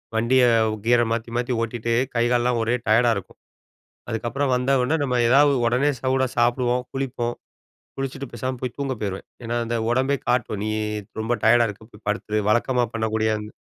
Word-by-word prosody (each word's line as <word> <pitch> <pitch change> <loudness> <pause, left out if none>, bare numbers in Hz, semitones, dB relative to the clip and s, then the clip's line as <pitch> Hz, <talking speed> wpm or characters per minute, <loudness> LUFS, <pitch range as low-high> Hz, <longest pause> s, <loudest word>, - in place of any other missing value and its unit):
வண்டிய 120 +3 +3 0.4
கீர 120 0 +4
மாத்தி 115 0 -2
மாத்தி 125 +1 -1
ஓட்டிட்டு, 115 0 -2 0.2
கை 115 0 +2
கால்லலாம் 120 -1 +2
ஒரே 115 +2 +1
டயர்டா 115 +2 +4
இருக்கும். 95 -1 -10 0.7
அதுக்கப்புறம் 120 +5 -1
வந்தோவுனே, 130 +4 +1
நம்ம 125 -3 +1
ஏதாவது 140 +3 +5
உடனே 125 +5 +2
சூடா 130 0 +1
சாப்புடுவோம், 120 +1 +2
குளிப்போம். 125 -3 -2 0.6
குளிச்சிட்டு 135 0 -4
பேசாம 130 +2 -3
போய், 125 -2 -4
தூங்க 135 -2 -2
போயிருவேன். 100 -2 -4 0.2
ஏன்னா, 120 +1 -2
அந்த 120 +1 -1
உடம்பே 130 +3 +2
காட்டும். 120 -4 0
நீ 110 - -1 0.5
ரொம்ப 115 +2 0
டயர்டா 120 +1 +5
இருக்க, 105 +1 -9
போய் 105 0 -18
படுத்துரு. 105 0 -1
வழக்கமா 120 +2 +2
பண்ணக்கூடிய 110 -1 0
அந் 105 - -7
120 Hz, 160 wpm, -23 LUFS, 115-130 Hz, 0.7 s, ஏதாவது